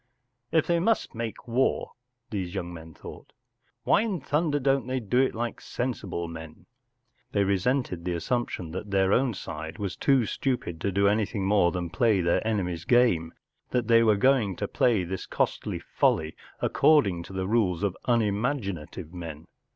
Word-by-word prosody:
“ 125 -1 -51
If - - -15
they 170 -1 +2
must 220 +6 +1
make 115 0 -5
war,” 125 +3 +1 0.4
these 95 -3 -3
young 90 -2 -4
men 80 -1 -11
thought, - - -11 0.3
“ - - -45
why - - +4
in 210 -6 -1
thunder 145 +2 0
don't 135 -2 +1
they 130 0 -1
do 120 +2 0
it 130 -3 +2
like 120 +1 -3
sensible 105 -9 -3
men? 80 -1 -10 0.3
” 120 -1 -44
They 100 - +3
resented 100 -1 0
the 90 - -1
assump¬ 120 +7 -1
tion 85 -3 -6
that 95 +4 -6
their 95 0 +2
own 125 -3 +2
side 80 -3 -6
was 100 -5 -3
too 135 -4 +3
stupid 105 -10 -2
to 100 - 0
do 100 +1 +3
anything 105 -1 0
more 100 -3 +3
than 85 -2 -4
play 105 +2 +3
their 85 -1 +2
enemy’s 90 -6 -1
game, 90 -9 +3 0.3
that 125 -3 0
they 115 0 +6
were 110 -3 +4
going 115 -5 +3
to 100 - -3
play 110 -4 +2
this 90 +1 -5
costly - - -1
folly 80 0 0 0.3
according 105 - +3
to - - -11
the 95 0 -2
rules 100 -4 +1
of 100 -2 0
unimagi¬ 115 0 +1
native 85 +1 -9
men. 80 -3 -7
100 Hz, 180 wpm, -27 LUFS, 90-125 Hz, 0.4 s, they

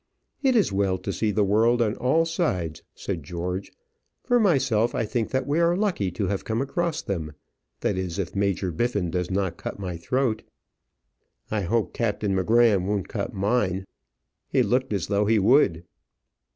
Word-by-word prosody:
"It 265 -3 +3
is 205 - +3
well 95 -1 +1
to 100 - -4
see 110 - 0
the 105 0 +2
world 110 +5 +3
on 110 -2 +1
all 160 +6 +2
sides," 95 - -1
said 90 -5 -4
George. 90 +5 -4 0.5
"For 245 -1 +3
myself, 135 - +2
I 115 - 0
think 115 +1 -2
that 130 -1 -1
we 145 +4 +1
are 170 +1 +3
lucky 190 - 0
to 100 - -1
have 100 +1 -2
come 110 0 -2
across 165 +5 -1
them 80 -6 -4 0.5
that 95 - 0
is, 90 -2 -4
if 95 -2 -3
Major 100 -2 0
Biffin 100 -1 -1
does 90 0 -2
not 95 -3 -1
cut - - -6
my 90 -4 -5
throat." 120 +4 0 1.1
"I 110 -1 0
hope 110 +4 0
Captain 105 -3 -1
M'Gramm 105 -1 +3
won't 100 -2 -1
cut - - -3
mine. 95 -2 0 0.6
He - - +2
looked 130 0 0
as 100 -6 -1
though 100 0 +1
he 110 0 +4
would." 100 - +4
105 Hz, 175 wpm, -25 LUFS, 95-125 Hz, 1.1 s, he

